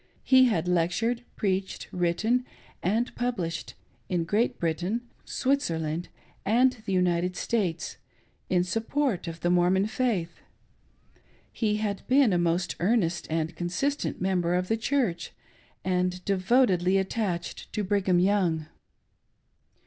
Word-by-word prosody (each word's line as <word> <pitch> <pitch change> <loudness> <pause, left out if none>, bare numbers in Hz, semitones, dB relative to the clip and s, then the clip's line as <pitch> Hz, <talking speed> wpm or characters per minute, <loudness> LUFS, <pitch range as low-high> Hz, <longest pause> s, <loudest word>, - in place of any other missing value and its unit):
He 260 -1 +6
had 180 -9 +1
lectured, 180 +8 +1
preached, 190 -1 -2
written 185 +8 +1 0.4
and; 220 +7 0
published, 190 -10 -3 0.3
in 175 -2 +1
Great 210 +8 +1
Britain, 175 +7 -1 0.2
Switzerland, 170 - -1 0.3
and 250 +5 +4
the - - -1
United 180 -1 +1
States, 180 -8 -1 0.5
in 180 -1 +3
support 225 +1 -1
of 165 0 -6
the 175 - +2
Mormon 180 +2 +3
faith. 215 -7 -1 1.1
He 215 -3 0
had 210 -2 -2
been 260 -5 +4
a 175 - +2
most 175 +1 0
earnest 180 -3 +1
and 160 0 -1
consistent 185 - -2
member 180 -2 +1
of 180 0 -1
the 225 - +3
Church, 225 - -1 0.5
and 180 0 0
devotedly 195 -2 +3
attached 190 -3 -2
to 210 - -1
Brigham 195 -2 +2
Young. 175 -4 +2
185 Hz, 120 wpm, -27 LUFS, 175-225 Hz, 1.1 s, He